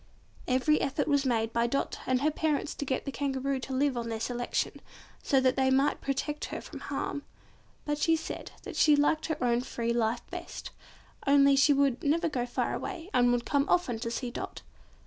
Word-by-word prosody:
Every 260 +4 +3
effort 285 +2 0
was 285 -2 +2
made 225 -2 0
by 235 0 +2
Dot 275 +3 -2
and 255 0 +2
her 305 +2 +2
parents 305 -1 -1
to 285 - -5
get 260 -1 -2
the 275 - -3
Kangaroo 275 -1 -1
to 265 +1 -6
live 275 0 +1
on 235 -1 -3
their 225 -1 -3
selection, 245 +1 -2 0.4
so 270 - +3
that 260 -1 +3
they 265 -1 +2
might 270 +2 +2
protect 295 +2 -2
her - - -5
from - - -9
harm. 285 - -3 0.6
But 295 0 -1
she 325 +2 +3
said 320 - -5
that - - -7
she 300 -1 +5
liked 295 +2 +2
her 315 -2 -1
own 240 0 +2
free 235 -2 -2
life 235 0 0
best, - - -7 0.6
only 280 0 +6
she 275 +2 +5
would 275 -3 +2
never 330 +3 +2
go 245 -5 -2
far 245 - -1
away 370 -1 -5
and 245 0 +4
would 245 -1 0
come 285 0 +1
often 260 -11 +2
to 230 - -3
see 240 +1 -3
Dot. - - -6
270 Hz, 205 wpm, -29 LUFS, 245-290 Hz, 0.6 s, only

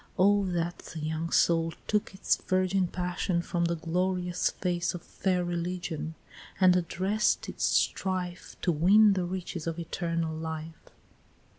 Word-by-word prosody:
Oh, 200 +1 +4
that 175 -1 -2
the 165 - -8
young 160 +2 -2
soul 165 -1 +3
took 210 -2 -1
Its 190 - +2
virgin 185 0 +1
passion 180 0 -1
from 170 -1 0
the 170 0 0
glorious 180 +2 0
face 175 -1 -1
Of 175 - -7
fair 180 -2 -1
religion, 175 -2 -3 0.4
and 185 -2 +6
address'd 190 +4 +1
its - - -2
strife, 185 -2 0
To 175 - +3
win 200 +7 +6
the 185 -2 -1
riches 180 -2 -5
of 165 0 -2
eternal 165 -1 -2
life!" 160 0 -6
175 Hz, 140 wpm, -29 LUFS, 165-185 Hz, 0.4 s, and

